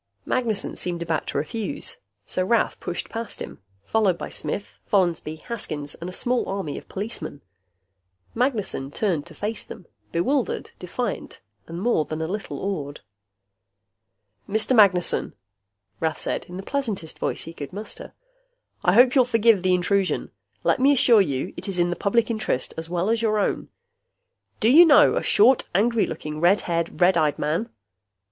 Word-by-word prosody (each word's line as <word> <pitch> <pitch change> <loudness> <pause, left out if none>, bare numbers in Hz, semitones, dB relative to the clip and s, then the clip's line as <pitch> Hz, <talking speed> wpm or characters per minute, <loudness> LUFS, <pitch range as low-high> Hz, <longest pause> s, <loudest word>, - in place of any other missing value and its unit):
Magnessen 225 -5 -1
seemed 175 -1 -3
about 165 -1 -2
to - - -2
refuse, 220 - -4 0.3
so 185 - -1
Rath 230 +5 +1
pushed - - -4
past 230 -1 -5
him, - - -8 0.2
followed 205 -6 +2
by - - -6
Smith, 205 - -4
Follansby, 175 -5 +1
Haskins, 155 -11 -4
and 170 +2 -7
a - - -6
small 250 +6 -1
army 190 -7 -3
of - - -9
policemen. 195 -8 -5 0.9
Magnessen 225 - -1
turned 170 -2 -1
to 165 - -13
face 210 +5 -3
them, - - -11 0.3
bewildered, 255 +10 0
defiant 200 +5 -4 0.3
and 170 +1 -6
more 210 -6 +2
than 155 +1 -5
a 160 - -1
little 200 +5 -4
awed. 150 -8 -4 1.5
"Mr. 220 +5 +1
Magnessen," 195 -5 +3 0.6
Rath 160 -1 -1
said, - - -2
in 180 - -9
the 190 - -6
pleasantest 220 - -3
voice - - -2
he 165 - -9
could 145 -4 -7
muster, 210 +3 -6 0.7
"I 180 - +4
hope 245 +4 +6
you'll 260 - +6
forgive 230 -4 +3
the 185 0 +3
intrusion. 190 +1 0 0.3
Let - - +2
me 270 +2 +5
assure 235 -5 +6
you, 140 -7 -2
it - - -6
is 195 -2 -2
in 175 0 +2
the - - -1
Public 225 +6 +1
Interest, 215 - -2
as 160 0 -5
well 180 +4 0
as 230 0 +1
your 215 -2 +2
own. 205 - -1 0.9
Do 225 - +4
you 325 +6 +10
know 310 -4 +6
a - - +1
short, 270 - +4
angry 225 +2 +3
looking, 150 0 -5
red 180 +4 +4
haired, 170 -1 -2
red 180 0 +5
eyed 150 -2 +1
man?" 165 +10 -1
195 Hz, 165 wpm, -24 LUFS, 170-230 Hz, 1.5 s, you